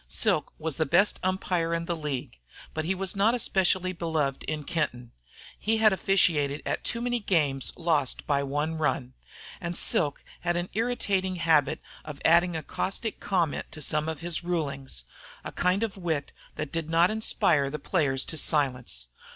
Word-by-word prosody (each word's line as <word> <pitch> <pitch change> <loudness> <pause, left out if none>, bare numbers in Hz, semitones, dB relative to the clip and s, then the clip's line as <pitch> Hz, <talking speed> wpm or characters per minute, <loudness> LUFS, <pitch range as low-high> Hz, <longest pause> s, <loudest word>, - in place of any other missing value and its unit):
Silk - - +1
was 155 -3 -2
the 160 - +2
best 180 +8 +3
umpire 180 -3 0
in 170 0 -2
the 170 - -1
league. 145 - -4 0.3
But 155 0 -2
he 190 +3 0
was 190 0 0
not 210 +5 +3
especially 185 -5 +2
beloved 160 -5 -1
in 155 -1 -3
Kenton. 125 -7 -2 0.5
He 220 +1 +1
had 215 -2 +5
officiated 160 -7 +2
in - - +1
too 235 - -2
many 245 0 0
games 150 - +1
lost 160 -6 +1
by 140 -1 +1
one 150 +3 -2
run. 130 -4 -1 0.5
And 175 -1 -3
Silk 145 -4 +2 0.2
had 175 0 0
an 175 +1 -2
irritating 200 -4 0
habit 160 -3 +2 0.2
of 150 -2 -8
adding 170 +1 +5
a 160 - -5
caustic 195 +8 -3
comment 175 -6 -1
to - - -7
some 155 +2 +1
of 160 -3 -5
his 175 0 -2
rulings, 140 - -2 0.4
a - - -5
kind 185 +4 +1
of 215 -3 -3
wit 160 -6 -2 0.2
that 155 -2 -4
did 165 -1 -3
not 170 +3 +4
inspire 155 -9 +2
the 150 - -4
players 140 -4 +1
to 160 - -4
silence. 125 - +1
165 Hz, 170 wpm, -27 LUFS, 145-185 Hz, 0.5 s, had